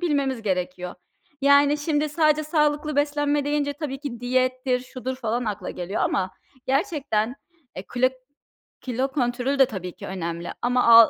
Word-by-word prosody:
bilmemiz 280 -8 0
gerekiyor. 180 -2 -2 0.5
Yani 280 +1 +5
şimdi 295 0 0
sadece 305 0 +3
sağlıklı 300 -1 +1
beslenme 290 0 +2
deyince 290 0 0
tabii 285 -2 -5
ki 265 -5 -6
diyettir, 255 0 +1
şudur 255 +1 -5
falan 240 -1 -1
akla 210 -3 -3
geliyor 180 +3 -3
ama 185 -1 +1 0.4
gerçekten 270 - 0 0.4
e, 185 - -5
klo 250 +1 +2 0.7
kilo 255 +1 -1
kontrolü 255 +1 0
de 270 - +8
tabii 190 -7 -5
ki - - -8
önemli. 170 -2 -4
Ama 250 +1 +2
al 230 -1 +9
260 Hz, 145 wpm, -25 LUFS, 230-290 Hz, 0.7 s, al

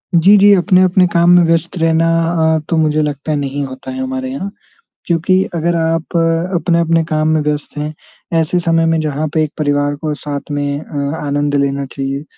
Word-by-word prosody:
जी, 190 +5 +6
जी, 205 +1 +6
अपने-अपने 185 -1 +3
काम 170 0 +3
में 175 - +6
व्यस्त 165 +2 0
रहना 165 0 +2 0.5
अ, - - 0
तो 165 - +1
मुझे 155 -1 +2
लगता 150 0 -3
है, 150 - 0
नहीं 140 0 -3
होता 130 - -8
है 260 - -5
हमारे 260 0 -4
यहाँ, 200 -7 -5 0.6
क्योंकि 185 +3 +2
अगर 170 +1 0
आप 165 +1 -1 0.4
अपने-अपने 170 -1 +1
काम 155 0 +1
में 155 0 +2
व्यस्त 150 0 -3
हैं, 150 +1 -4 0.5
ऐसे 160 +3 0
समय 165 -1 +1
में 165 0 +1
जहाँ 155 0 -2
पे 160 - +2
एक 150 - -5
परिवार 145 -1 0
को 150 0 -3
साथ 145 -1 -6
में 145 0 -2
अ, 145 0 -4
आनंद 145 0 -1
लेना 140 0 0
चाहिए, 135 +2 -5
160 Hz, 190 wpm, -15 LUFS, 145-170 Hz, 0.6 s, जी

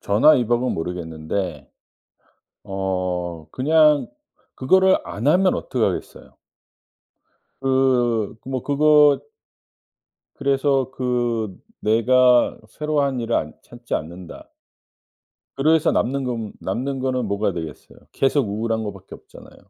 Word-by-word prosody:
전화위복은 120 +2 +3
모르겠는데 80 -2 -4 0.9
어 90 -4 -3
그냥 150 +1 +3 0.5
그거를 190 +8 +4
안하면 170 - +2
어떡하겠어요. - - -3 1.3
그 125 -5 +1
뭐 130 -1 -4
그거 150 0 +4 1.2
그래서 135 -1 0
그 120 -6 -2 0.2
"내가 125 +3 +3
새로 150 +5 -2
한 135 -3 0
일을 115 0 -2
안 75 - -3
찾지 120 0 -7
않는다" 85 +3 -7 1.1
그래서 155 +3 +3
남는 135 +2 0
건 115 -4 -4
남는 130 +8 -3
거는 130 -2 -1
뭐가 100 0 -1
되겠어요. 80 -4 -8
계속 135 -3 +1
우울한 110 +2 -2
거밖에 100 -3 -8
없잖아요. - - -15
120 Hz, 225 characters per minute, -22 LUFS, 100-135 Hz, 1.3 s, 그거를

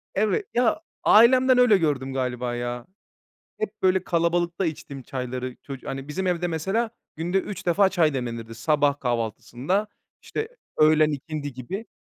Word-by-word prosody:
Evet, 215 - +1
ya, 245 +5 +2 0.2
ailemden 255 +3 +6
öyle 245 -5 +6
gördüm 140 -6 -1
galiba, 125 -2 -2
ya. 120 0 -4 0.7
Hep 215 0 -5
böyle 185 0 +3
kalabalıkta 175 +1 +1
içtim 140 -3 -6
çayları. 125 0 -5
Çocu 135 -2 -8
hani, 135 +1 -5
bizim 185 +5 -3
evde, 175 -1 0
mesela, 195 +8 -1 0.3
günde 175 +4 0
3 195 0 -6
defa 190 +3 +4
çay 165 -6 +2
demlenirdi. 115 -3 -4
Sabah 145 +4 +1
kahvaltısında, 125 - -1 0.4
işte, 440 - -4 0.3
öğlen 155 0 +5
ikindi 145 0 -5
gibi 180 - -6
155 Hz, 140 wpm, -25 LUFS, 130-190 Hz, 0.7 s, ailemden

